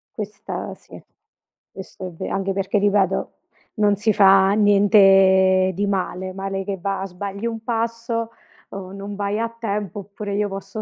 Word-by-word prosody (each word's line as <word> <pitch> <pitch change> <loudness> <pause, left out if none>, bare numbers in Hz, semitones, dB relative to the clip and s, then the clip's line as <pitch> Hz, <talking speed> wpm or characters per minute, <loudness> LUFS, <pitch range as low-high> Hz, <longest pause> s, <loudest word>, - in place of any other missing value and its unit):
Questa 210 -1 -6
sì, - - -14 0.7
questo 190 0 -9
è - - -8
ve 165 - -6
anche 195 0 -1
perché 195 +2 -1
ripeto, 200 -2 +1 0.4
non 210 -2 +3
si 210 +2 +1
fa 195 -1 +6
niente 195 -2 +5
di 200 +3 -1
male. 185 -1 -2
Male 195 0 -4
che 195 0 -4
va 195 +1 -2
sbagli 200 +4 -5
un 225 -1 -5
passo, 230 0 -2 0.4
uhm, 195 -1 -8
non 200 +1 -7
vai 205 +1 -2
a 230 0 -1
tempo, 210 -4 -4
oppure 200 +1 -6
io 205 0 0
posso 195 +2 -6
200 Hz, 155 wpm, -21 LUFS, 195-210 Hz, 0.7 s, fa